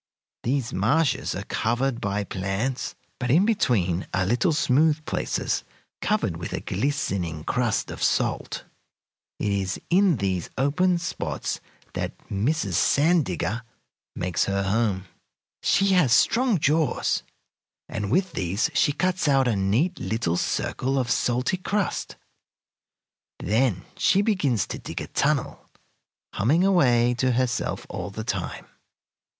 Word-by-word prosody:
These 125 Hz, -1 st, -1 dB
marshes 135 Hz, -, +1 dB
are -, -, -4 dB
covered 120 Hz, +2 st, -1 dB
by 100 Hz, +1 st, -1 dB
plants, 95 Hz, +7 st, -3 dB, 0.2 s
but 125 Hz, -, -2 dB
in 165 Hz, +10 st, +5 dB
between 105 Hz, -, +1 dB
are 95 Hz, 0 st, +1 dB
little 120 Hz, -, +2 dB
smooth 150 Hz, +2 st, +2 dB
places -, -, -1 dB, 0.4 s
covered -, -, 0 dB
with -, -, -6 dB
a -, -, -1 dB
glistening 95 Hz, -, -2 dB
crust 120 Hz, +4 st, 0 dB
of -, -, -8 dB
salt. -, -, 0 dB, 0.7 s
It 105 Hz, -, -1 dB
is 95 Hz, -2 st, -1 dB
in 185 Hz, -4 st, +4 dB
these 95 Hz, -4 st, -1 dB
open 175 Hz, +7 st, +2 dB
spots 170 Hz, +2 st, -3 dB, 0.3 s
that -, -, -4 dB
Mrs. 130 Hz, +12 st, 0 dB
Sand 160 Hz, +1 st, +3 dB
Digger 105 Hz, +5 st, -2 dB, 0.5 s
makes 90 Hz, -1 st, 0 dB
her 100 Hz, 0 st, 0 dB
home. 100 Hz, -2 st, 0 dB, 0.6 s
She 195 Hz, 0 st, +3 dB
has 180 Hz, -10 st, +4 dB
strong 230 Hz, -, +4 dB
jaws, 155 Hz, +1 st, +1 dB, 0.7 s
and 105 Hz, -2 st, -3 dB
with 185 Hz, -, +1 dB
these 100 Hz, -, 0 dB
she 145 Hz, +1 st, +3 dB
cuts 185 Hz, +1 st, 0 dB
out 135 Hz, -2 st, +4 dB
a 115 Hz, -, +2 dB
neat 110 Hz, -, +1 dB
little 95 Hz, -3 st, -1 dB
circle 130 Hz, +8 st, -1 dB
of 125 Hz, -2 st, 0 dB
salty 125 Hz, +9 st, +1 dB
crust. 200 Hz, +2 st, -2 dB, 1.2 s
Then 110 Hz, -2 st, +1 dB
she 195 Hz, +2 st, +3 dB
begins 145 Hz, -, +1 dB
to -, -, -5 dB
dig -, -, -6 dB
a -, -, -4 dB
tunnel, -, -, -1 dB, 0.6 s
humming 145 Hz, -, +2 dB
away 125 Hz, -11 st, +4 dB
to 130 Hz, -1 st, +2 dB
herself 125 Hz, 0 st, -1 dB
all -, -, -5 dB
the 110 Hz, +2 st, -6 dB
time. -, -, -4 dB
125 Hz, 130 wpm, -25 LUFS, 100-160 Hz, 1.2 s, in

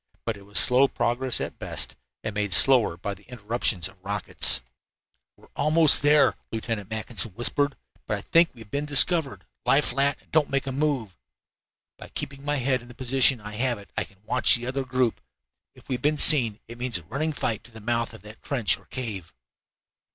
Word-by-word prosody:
But 115 Hz, -, -2 dB
it 100 Hz, 0 st, -15 dB
was 100 Hz, -, -2 dB
slow 130 Hz, +2 st, +5 dB
progress 120 Hz, +1 st, 0 dB
at -, -, -5 dB
best, -, -, 0 dB, 0.3 s
and 110 Hz, -, -4 dB
made 105 Hz, -3 st, 0 dB
slower 125 Hz, -9 st, +4 dB
by 100 Hz, +3 st, -4 dB
the 100 Hz, -, -15 dB
interruptions 110 Hz, -6 st, -1 dB
of 95 Hz, -, -17 dB
the -, -, -36 dB
rockets. 100 Hz, 0 st, -1 dB, 0.8 s
"We -, -, -24 dB
are -, -, -21 dB
almost 155 Hz, +1 st, +5 dB
there," 145 Hz, 0 st, +5 dB, 0.2 s
Lieutenant 110 Hz, -3 st, -4 dB
Mackinson 110 Hz, -1 st, -2 dB
whispered, 140 Hz, +4 st, -1 dB, 0.3 s
"but 105 Hz, -, -1 dB
I -, -, -8 dB
think 165 Hz, -, +4 dB
we 115 Hz, -, -14 dB
have 105 Hz, -, -14 dB
been 145 Hz, +1 st, -2 dB
discovered. 145 Hz, +1 st, +4 dB, 0.2 s
Lie 140 Hz, -, +4 dB
flat 140 Hz, +1 st, +1 dB
and -, -, -29 dB
don't 155 Hz, -2 st, +2 dB
make 140 Hz, 0 st, -1 dB
a 135 Hz, -, -3 dB
move. 135 Hz, -, -1 dB, 0.8 s
By -, -, -10 dB
keeping 140 Hz, 0 st, -6 dB
my 145 Hz, +1 st, -1 dB
head 130 Hz, -1 st, 0 dB
in 120 Hz, -, -15 dB
the 120 Hz, -, -13 dB
position 130 Hz, 0 st, +2 dB
I 105 Hz, +1 st, -8 dB
have 120 Hz, -1 st, 0 dB
it 100 Hz, -1 st, -15 dB
I -, -, 0 dB
can 95 Hz, -, -17 dB
watch 125 Hz, -, +3 dB
that 120 Hz, +1 st, -5 dB
other 135 Hz, 0 st, -3 dB
group. 130 Hz, -2 st, 0 dB, 0.5 s
If -, -, -19 dB
we -, -, -2 dB
have 125 Hz, -, -3 dB
been 150 Hz, +2 st, +1 dB
seen 120 Hz, -9 st, +5 dB
it 120 Hz, +1 st, -11 dB
means 125 Hz, -4 st, -2 dB
a 85 Hz, -, -10 dB
running 140 Hz, -, -2 dB
fight 115 Hz, -7 st, -3 dB
to 120 Hz, -, -15 dB
the 110 Hz, -, -12 dB
mouth 115 Hz, +1 st, -2 dB
of 110 Hz, -, -15 dB
that 105 Hz, +1 st, -13 dB
trench 120 Hz, -10 st, +1 dB
or -, -, -23 dB
cave." 110 Hz, -10 st, -6 dB
120 Hz, 210 wpm, -25 LUFS, 105-135 Hz, 0.8 s, slow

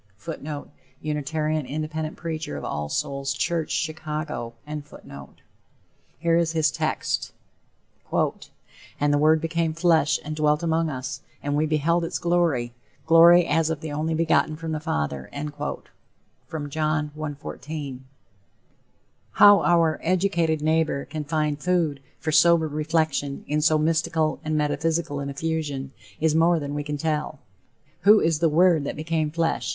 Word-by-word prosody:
[Footnote: 150 Hz, 0 st, -7 dB, 0.3 s
Unitarian 155 Hz, 0 st, -1 dB
Independent 155 Hz, +1 st, -4 dB
preacher 160 Hz, -, -4 dB
of 70 Hz, -, -6 dB
All 75 Hz, 0 st, -3 dB
Souls 140 Hz, -, -2 dB
Church, 165 Hz, -3 st, -1 dB
Chicago.] 155 Hz, -6 st, -3 dB, 1.6 s
Here 165 Hz, +2 st, +2 dB
is 165 Hz, -1 st, +1 dB
his 160 Hz, -2 st, +2 dB
text: -, -, -2 dB, 0.8 s
"And 145 Hz, 0 st, -3 dB
the 145 Hz, -, +3 dB
Word 155 Hz, +1 st, +4 dB
became 165 Hz, 0 st, -1 dB
flesh 165 Hz, -3 st, +3 dB
and 155 Hz, +1 st, -4 dB
dwelt 150 Hz, 0 st, +1 dB
among 165 Hz, 0 st, +1 dB
us, 130 Hz, -3 st, -5 dB, 0.2 s
and 145 Hz, 0 st, -1 dB
we 155 Hz, +1 st, +1 dB
beheld 160 Hz, +3 st, +1 dB
his 165 Hz, -, -2 dB
glory, 165 Hz, -9 st, +1 dB, 0.3 s
glory 170 Hz, +2 st, +7 dB
as 160 Hz, +1 st, +1 dB
of 160 Hz, -1 st, -3 dB
the 160 Hz, -2 st, -5 dB
only 155 Hz, +2 st, -1 dB
begotten 160 Hz, -1 st, +2 dB
from 160 Hz, 0 st, -5 dB
the 155 Hz, -, -2 dB
Father." 75 Hz, -, -3 dB, 1.4 s
John 155 Hz, 0 st, -1 dB
1:14. 150 Hz, -2 st, -6 dB, 1.3 s
How 205 Hz, -1 st, +7 dB
our 165 Hz, -2 st, +3 dB
educated 170 Hz, -3 st, +1 dB
neighbor 155 Hz, -3 st, +1 dB
can 155 Hz, -1 st, -5 dB
find 150 Hz, -1 st, -1 dB
food 170 Hz, -6 st, +1 dB, 0.2 s
for 160 Hz, -, -3 dB
sober 170 Hz, 0 st, +5 dB
reflection 155 Hz, -2 st, -1 dB
in 150 Hz, +1 st, 0 dB
so 155 Hz, 0 st, +4 dB
mystical 160 Hz, 0 st, +1 dB
and 155 Hz, 0 st, -1 dB
metaphysical 155 Hz, 0 st, 0 dB
an 140 Hz, 0 st, -4 dB
effusion, 145 Hz, -2 st, -3 dB, 0.3 s
is 160 Hz, 0 st, +2 dB
more 165 Hz, +2 st, +4 dB
than 145 Hz, -1 st, -5 dB
we 145 Hz, 0 st, -2 dB
can 150 Hz, 0 st, -4 dB
tell. 150 Hz, 0 st, -2 dB, 0.6 s
Who 210 Hz, +1 st, +6 dB
is 160 Hz, -2 st, +1 dB
the 165 Hz, 0 st, +3 dB
Word 165 Hz, 0 st, +4 dB
that -, -, -3 dB
became 155 Hz, 0 st, -1 dB
flesh? 165 Hz, +1 st, -1 dB
155 Hz, 135 wpm, -24 LUFS, 150-165 Hz, 1.6 s, glory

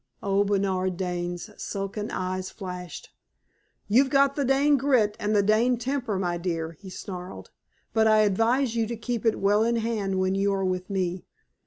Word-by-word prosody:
Old 200 Hz, 0 st, +2 dB
Bernard 190 Hz, -2 st, 0 dB
Dane's 175 Hz, +1 st, -3 dB
sunken 200 Hz, +1 st, -4 dB
eyes 185 Hz, 0 st, -3 dB
flashed. 180 Hz, -3 st, -8 dB, 0.8 s
"You've 260 Hz, +6 st, +4 dB
got 275 Hz, 0 st, +3 dB
the 285 Hz, -, 0 dB
Dane 275 Hz, +2 st, +3 dB
grit 250 Hz, -6 st, +2 dB
and 210 Hz, +1 st, 0 dB
the 205 Hz, -, +4 dB
Dane 225 Hz, +4 st, +3 dB
temper, 250 Hz, -4 st, -2 dB
my 175 Hz, -2 st, -1 dB
dear," 165 Hz, -2 st, -2 dB
he 190 Hz, +4 st, -12 dB
snarled. 180 Hz, 0 st, -8 dB, 0.4 s
"But 220 Hz, -1 st, +4 dB
I 215 Hz, 0 st, +5 dB
advise 230 Hz, +5 st, +2 dB
you 225 Hz, -1 st, +1 dB
to 235 Hz, 0 st, -4 dB
keep 235 Hz, 0 st, -2 dB
it 225 Hz, -, +2 dB
well 205 Hz, +2 st, +3 dB
in 235 Hz, +1 st, +1 dB
hand 220 Hz, -4 st, -1 dB
when 185 Hz, 0 st, +1 dB
you 200 Hz, +1 st, +1 dB
are 195 Hz, -1 st, -1 dB
with 185 Hz, 0 st, -2 dB
me. 185 Hz, -2 st, -2 dB
205 Hz, 175 wpm, -26 LUFS, 185-230 Hz, 0.8 s, I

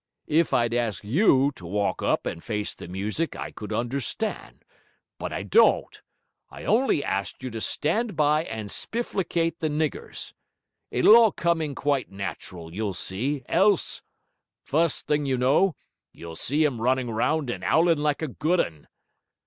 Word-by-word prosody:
If 160 Hz, +2 st, +2 dB
I'd 120 Hz, -1 st, +2 dB
ast 115 Hz, -6 st, -1 dB
you 140 Hz, -, +4 dB
to 95 Hz, -, -14 dB
walk 100 Hz, +4 st, -1 dB
up -, -, +1 dB
and 85 Hz, -, -4 dB
face 105 Hz, -3 st, -2 dB
the -, -, -10 dB
music 105 Hz, -, -2 dB
I -, -, -6 dB
could 105 Hz, 0 st, -8 dB
understand. 130 Hz, -, -3 dB, 0.5 s
But -, -, -4 dB
I -, -, -3 dB
don't. -, -, +3 dB, 0.5 s
I -, -, -10 dB
on'y 235 Hz, -, +2 dB
ast 100 Hz, +6 st, -3 dB
you 130 Hz, -, -4 dB
to 115 Hz, 0 st, -5 dB
stand 205 Hz, -, -1 dB
by 150 Hz, +1 st, +2 dB
and 110 Hz, -2 st, -6 dB
spifflicate 170 Hz, -8 st, -2 dB
the 160 Hz, -, 0 dB
niggers. 150 Hz, 0 st, -3 dB, 0.6 s
It'll 125 Hz, -, +6 dB
all 230 Hz, -3 st, +7 dB
come 170 Hz, -1 st, 0 dB
in 150 Hz, -3 st, -3 dB
quite 140 Hz, -2 st, 0 dB
natural; 90 Hz, -4 st, -7 dB
you'll 100 Hz, -1 st, -2 dB
see, 125 Hz, +10 st, -2 dB
else! 195 Hz, +2 st, +2 dB, 0.6 s
Fust 165 Hz, +2 st, +1 dB
thing, 145 Hz, -1 st, 0 dB
you 130 Hz, -1 st, +1 dB
know, 145 Hz, +8 st, +3 dB, 0.4 s
you'll 85 Hz, -1 st, -9 dB
see 145 Hz, -, +1 dB
him 130 Hz, -7 st, 0 dB
running 130 Hz, 0 st, +1 dB
round 135 Hz, +4 st, 0 dB
and 90 Hz, -5 st, -6 dB
owling 165 Hz, -, +3 dB
like 150 Hz, +1 st, 0 dB
a -, -, 0 dB
good 155 Hz, +6 st, 0 dB
un...' 80 Hz, -3 st, -2 dB
140 Hz, 160 wpm, -26 LUFS, 110-160 Hz, 0.6 s, all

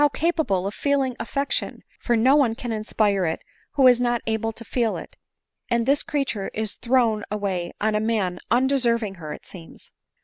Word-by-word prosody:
capable 310 Hz, -, +1 dB
of 200 Hz, -, -3 dB
feeling 275 Hz, -1 st, +1 dB
afiection! 280 Hz, +2 st, -2 dB, 0.2 s
for 240 Hz, -, +1 dB
no 255 Hz, +5 st, +5 dB
one 255 Hz, -6 st, +3 dB
can 240 Hz, 0 st, -5 dB
inspire 215 Hz, -2 st, +1 dB
it 160 Hz, -2 st, -2 dB, 0.3 s
>vho 265 Hz, -2 st, +7 dB
is 245 Hz, -1 st, +5 dB
not 240 Hz, -1 st, +1 dB
able 225 Hz, 0 st, -1 dB
to 230 Hz, +1 st, -10 dB
feel 230 Hz, -2 st, 0 dB
it; -, -, -10 dB, 0.5 s
and 235 Hz, -1 st, +1 dB
this 280 Hz, +3 st, +3 dB
creature 275 Hz, -11 st, -2 dB
is 220 Hz, -1 st, -1 dB
thrown 235 Hz, -4 st, +1 dB
away 195 Hz, -4 st, -2 dB
on 215 Hz, +1 st, +1 dB
a 210 Hz, -, +2 dB
man 210 Hz, -5 st, 0 dB
undeserving 240 Hz, -4 st, +2 dB
her, 155 Hz, -, -6 dB
ft 150 Hz, -, -8 dB
seems 170 Hz, -4 st, -11 dB
230 Hz, 175 wpm, -24 LUFS, 210-255 Hz, 0.5 s, >vho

